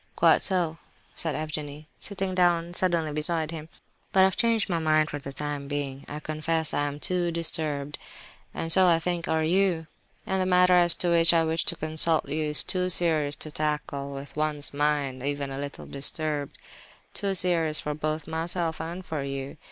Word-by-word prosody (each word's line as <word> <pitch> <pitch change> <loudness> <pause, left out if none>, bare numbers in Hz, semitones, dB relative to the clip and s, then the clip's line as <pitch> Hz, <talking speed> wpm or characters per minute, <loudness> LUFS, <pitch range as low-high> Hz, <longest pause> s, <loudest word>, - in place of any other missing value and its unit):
"Quite - - +4
so," 170 -5 -1 0.4
said 160 -2 -3
Evgenie, 150 -1 -5
sitting 195 -2 -2
down 175 -1 +2
suddenly 170 -4 +4
beside 155 +1 0
him, 160 -1 -8 0.4
"but 190 - +4
I - - +8
have 190 0 +3
changed 230 -2 +2
my 170 -3 -1
mind 155 -1 +2
for 145 - -4
the 140 0 -7
time 145 0 -4
being. 140 -1 -4
I 150 - -5
confess, 155 +1 -1
I 145 - 0
am 145 0 -6
too 175 +1 0
disturbed, 155 -4 -3 0.5
and 165 - -3
so, 185 +1 +6
I 170 -2 +5
think, 170 +1 -2
are 160 0 +1
you; 175 0 +1 0.4
and 190 0 0
the 185 - 0
matter 180 0 +5
as 175 -1 +6
to 175 - +1
which 170 0 +5
I 165 - +4
wished 160 0 -1
to - - +2
consult 155 0 +1
you 155 +2 -2
is 150 0 +4
too 185 -1 0
serious 155 -5 +2
to 155 - -5
tackle 150 -2 -3
with 135 +1 -9
one's 150 -1 -1
mind 145 -3 0
even 140 0 -3
a 135 - -5
little 140 0 -6
disturbed; 145 +1 0 0.6
too 200 -2 -1
serious 165 -4 +2
both 155 +1 -3
for - - -13
myself 165 0 -2
and 170 +3 -6
for 155 -3 -4
you. 135 +1 -5
155 Hz, 190 wpm, -26 LUFS, 145-175 Hz, 0.6 s, I